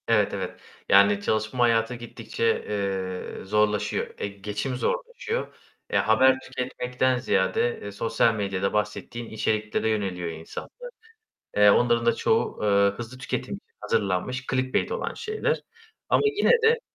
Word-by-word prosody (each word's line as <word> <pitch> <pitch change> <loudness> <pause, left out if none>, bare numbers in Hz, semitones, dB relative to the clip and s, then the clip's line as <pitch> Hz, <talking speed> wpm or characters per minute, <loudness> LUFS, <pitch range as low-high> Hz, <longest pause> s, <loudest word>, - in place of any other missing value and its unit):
Evet, - - +3
evet. - - -4 0.3
Yani, 100 +1 +6
çalışma 110 +4 0
hayatı 115 0 +2
gittikçe, 450 - -2
eee, 95 -2 -3
zorlaşıyor, 105 +1 +1
e, - - -2
geçim 105 +6 -4
zorlaşıyor. 485 - -3 0.4
Eee, - - +3
haber 130 +4 +4
tüketmekten 125 0 -1
ziyade, 95 +1 +1
eee, 100 - -6
sosyal 115 +2 +2
medyada 100 -2 -1
bahsettiğin 105 +2 -3
içeriklere 110 0 -1
yöneliyor 95 -5 -1
insanlar. 80 0 -8 0.9
Eee, 105 0 +7
onların 120 +2 +3
da 120 - +4
çoğu, 225 +1 +1
eee, 105 - +2 0.3
hızlı 120 +2 -7
tüketim 130 - -3
için - - -15
hazırlanmış 100 +7 -1
clickbait 130 - 0
olan 485 +1 -2
şeyler. 470 +2 -2 0.5
Ama - - +4
yine 420 +1 +3
de, 460 +1 +5
115 Hz, 130 wpm, -26 LUFS, 100-130 Hz, 0.9 s, Eee